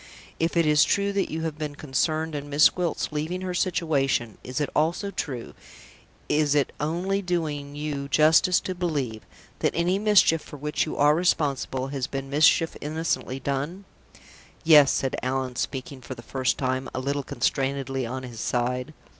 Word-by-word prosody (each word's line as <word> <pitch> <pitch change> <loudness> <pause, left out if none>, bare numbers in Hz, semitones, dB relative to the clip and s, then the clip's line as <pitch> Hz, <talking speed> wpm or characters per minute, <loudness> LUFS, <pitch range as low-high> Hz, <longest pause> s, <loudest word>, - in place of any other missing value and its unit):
If 165 +1 0
it 170 - +4
is 150 0 +5
true 200 0 +1
that 200 -1 0
you 160 +1 -3
have 160 -2 -4
been 150 -2 -4
concerned 155 +3 -1
in 145 0 -5
Miss 145 +3 +6
Gwilt's 175 -4 -2
leaving 155 +5 -3
her 185 -1 -3
situation, 145 - 0
is 125 +2 -4
it 145 - -1
also 170 +6 +1
true 130 -10 -5 0.7
is 150 -1 +2
it 145 -2 +2
only 180 +6 -1
doing 155 -6 -3
you 145 -2 -4
justice 160 +5 +5
to 185 - -4
believe 145 -11 -2 0.4
that - - 0
any 175 +3 +1
mischief 205 -6 +4
for 145 - -11
which 150 +2 -1
you - - -5
are 145 +1 +5
responsible 140 -6 0
has 135 -2 -3
been 135 0 -5
mischief 155 +2 +4
innocently 150 -3 -2
done?" 145 +9 -3 0.8
"Yes," 150 -4 +7
said 135 - -1
Allan, 130 -1 -2
speaking, 130 0 -4
for 130 +1 -7
the 120 - -11
first 130 +1 -1
time, 130 0 -1
a - - -1
little 140 +2 -1
constrainedly 135 0 -1
on 130 +2 -5
his 120 -3 -8
side. 125 +6 -2
150 Hz, 170 wpm, -25 LUFS, 135-165 Hz, 0.8 s, Yes